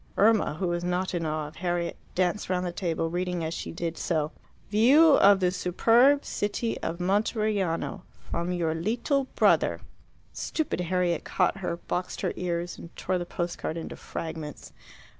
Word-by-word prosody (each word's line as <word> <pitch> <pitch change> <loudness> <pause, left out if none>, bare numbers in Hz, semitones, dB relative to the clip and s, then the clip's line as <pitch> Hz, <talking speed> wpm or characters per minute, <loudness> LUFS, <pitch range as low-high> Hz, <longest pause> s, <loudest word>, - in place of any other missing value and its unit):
Irma, 215 -6 +4
who 180 +2 -1
was 175 0 -1
not 180 +2 -1
in 165 -2 -1
awe 155 -1 -2
of 155 - -13
Harriet, 175 -1 -1 0.2
danced 185 +2 0
round 180 0 0
the 175 - -2
table, 165 -2 -2
reading 180 -1 -1
as 160 +1 -2
she - - -5
did 165 0 -4
so, 155 -3 0 0.4
"View 265 +10 +6
of 200 0 +6
the 180 -1 +2
superb 230 +10 +4
city 210 +3 -2
of 165 +1 -3
Monteriano 200 -2 0 0.3
from 170 +1 -1
your 170 -3 0
lital 235 - 0
brother." - - +3 0.5
Stupid 315 - -2
Harriet 180 -1 0
caught 185 +1 +1
her, 180 -3 -3
boxed 180 +1 -4
her - - -1
ears, 175 -1 -3
and 170 - -11
tore 185 0 -1
the 175 - -5
post 175 0 -3
card 160 - -3
into 165 - -6
fragments. 160 -2 -7
180 Hz, 165 wpm, -27 LUFS, 170-200 Hz, 0.5 s, View